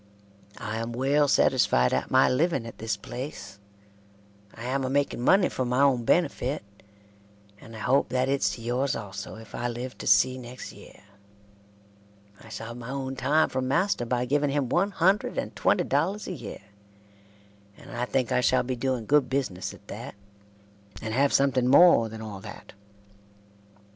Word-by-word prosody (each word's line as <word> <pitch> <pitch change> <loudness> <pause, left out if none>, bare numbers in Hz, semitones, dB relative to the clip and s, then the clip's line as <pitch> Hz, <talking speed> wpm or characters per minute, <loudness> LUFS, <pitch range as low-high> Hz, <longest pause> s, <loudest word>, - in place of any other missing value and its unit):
I 110 -1 -4
am 115 +1 -4
well 140 +4 +2
satisfied 60 - +3
at - - -1
my 130 0 +5
living 140 -2 +1
at 115 - -10
this 110 -2 -2
place 100 -3 -8 1.0
I 115 - -9
am 135 +2 -1
a 130 - -1
making 140 -2 0
money 190 +9 +4
for 130 - -3
my 125 +2 +1
own 130 -4 +2
benifit 145 -5 +1 1.0
and 115 +2 -12
I 110 - -8
hope 130 +3 +2
that 130 +1 0
its 135 -7 +1
to 115 - -11
yours 125 +3 0
also 100 -1 -7
If 110 0 -13
I 120 - -2
live 120 +2 -5
to - - -6
see 130 +5 +4
Nexct 125 +1 -9
year - - -15 1.4
I 110 - -14
shall 115 +1 -7
heve 120 - -8
my 120 0 -8
own 135 0 -4
time 155 +4 +2
from 130 0 -2
master 165 -3 +1
by 125 +1 0
giving 145 +3 +1
him 140 -3 -1
100 195 +3 +1
and - - -3
twenty - - +2
Dollars 205 +2 -1
a - - -4
year 145 - -8 1.1
and - - -13
I 120 +1 -2
thinke 130 0 -1
I 125 0 +2
shall 125 0 +3
be 130 +1 -3
doing 125 -2 -2
good 145 0 +3
bisness 130 -10 -2
at - - -16
that - - -7 0.8
and 110 -1 -5
heve 140 +3 +3
something 130 -2 +2
more 135 -5 +6
thean 110 0 -8
all 105 -3 -7
that. - - -11
125 Hz, 175 wpm, -26 LUFS, 115-140 Hz, 1.4 s, more